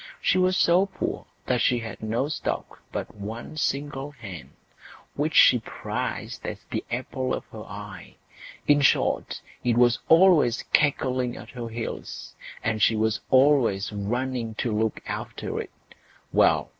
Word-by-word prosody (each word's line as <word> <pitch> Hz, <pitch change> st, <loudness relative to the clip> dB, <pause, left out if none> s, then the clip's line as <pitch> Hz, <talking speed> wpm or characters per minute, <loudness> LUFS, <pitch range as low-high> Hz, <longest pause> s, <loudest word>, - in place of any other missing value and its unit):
She 185 Hz, -, +2 dB
was 185 Hz, 0 st, +3 dB
so 180 Hz, +3 st, +4 dB
poor 190 Hz, -, -4 dB, 0.2 s
that 125 Hz, -2 st, +1 dB
she 125 Hz, -, +3 dB
had 115 Hz, -4 st, -6 dB
no 115 Hz, +5 st, -1 dB
stock 155 Hz, -, -4 dB
but -, -, -4 dB
one 110 Hz, +8 st, -7 dB
single 145 Hz, -1 st, -2 dB
hen, 110 Hz, -, -10 dB, 0.6 s
which 150 Hz, +2 st, -1 dB
she 125 Hz, -, +7 dB
prized 115 Hz, -, -5 dB
as -, -, -6 dB
the -, -, -2 dB
apple 130 Hz, +2 st, -2 dB
of -, -, -7 dB
her 110 Hz, -, -8 dB
eye; 105 Hz, +1 st, -9 dB, 0.5 s
in 145 Hz, 0 st, +5 dB
short, 140 Hz, -, +2 dB, 0.2 s
it 120 Hz, -2 st, +2 dB
was 120 Hz, -1 st, +4 dB
always 160 Hz, -8 st, +5 dB
cackling 130 Hz, -4 st, +2 dB
at -, -, -10 dB
her 120 Hz, -3 st, -6 dB
heels, 115 Hz, 0 st, -6 dB, 0.3 s
and 110 Hz, -1 st, 0 dB
she 115 Hz, -, +5 dB
was 110 Hz, 0 st, +1 dB
always 130 Hz, -8 st, +4 dB
running 115 Hz, +2 st, -2 dB
to 110 Hz, -1 st, -1 dB
look 110 Hz, 0 st, 0 dB
after -, -, -4 dB
it. -, -, -8 dB, 0.6 s
Well! -, -, +4 dB
125 Hz, 145 wpm, -26 LUFS, 110-145 Hz, 0.6 s, she